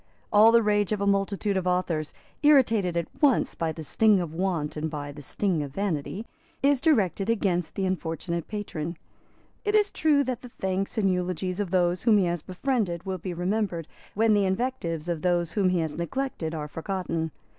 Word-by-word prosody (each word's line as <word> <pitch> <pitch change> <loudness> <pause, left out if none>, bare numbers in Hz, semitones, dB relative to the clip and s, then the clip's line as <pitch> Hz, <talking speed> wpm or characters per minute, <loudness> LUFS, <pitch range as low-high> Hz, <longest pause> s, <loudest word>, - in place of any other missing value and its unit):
All 215 +2 +8
the 230 0 +5
rage 205 -1 +2
of 210 - 0
a 200 - 0
multitude 200 0 +1
of 185 -1 -1
authors, 175 -4 0 0.3
irritated 230 - +4
at 170 - 0 0.2
once 280 -5 +3
by 165 -1 -2
the 160 0 -7
sting 210 +6 +3
of 170 -3 -4
want 165 -4 -1
and 155 +1 -2
by 145 -2 -5
the 145 +1 -10
sting 175 +3 -1
of 140 -2 -6
vanity, 195 +2 -2 0.4
is 280 -2 +3
directed 210 - +2
against 185 -7 0
the 195 - -1
unfortunate 170 -2 -3
patron. 170 -6 -4 0.7
It 415 0 +1
is 415 -1 +3
true 295 -3 +3
that 255 -3 -3
the 250 - -10
thanks 190 -2 -3
and 195 -3 +3
eulogies 180 +1 -2
of 205 -3 -1
those 175 -1 +2
whom 225 -3 +5
he 195 - +3
has 175 -2 -1
befriended 185 - -2
will 190 -1 -3
be 180 0 -5
remembered 180 -2 -1 0.3
when 220 +1 +4
the 205 -1 +3
invectives 190 -6 -2
of 170 -3 -2
those 175 -1 +1
whom 195 -3 +2
he 180 -2 +1
has 160 -2 -3
neglected 170 -3 -3
are 150 -1 -4
forgotten. 165 0 -3
185 Hz, 190 wpm, -26 LUFS, 170-210 Hz, 0.7 s, All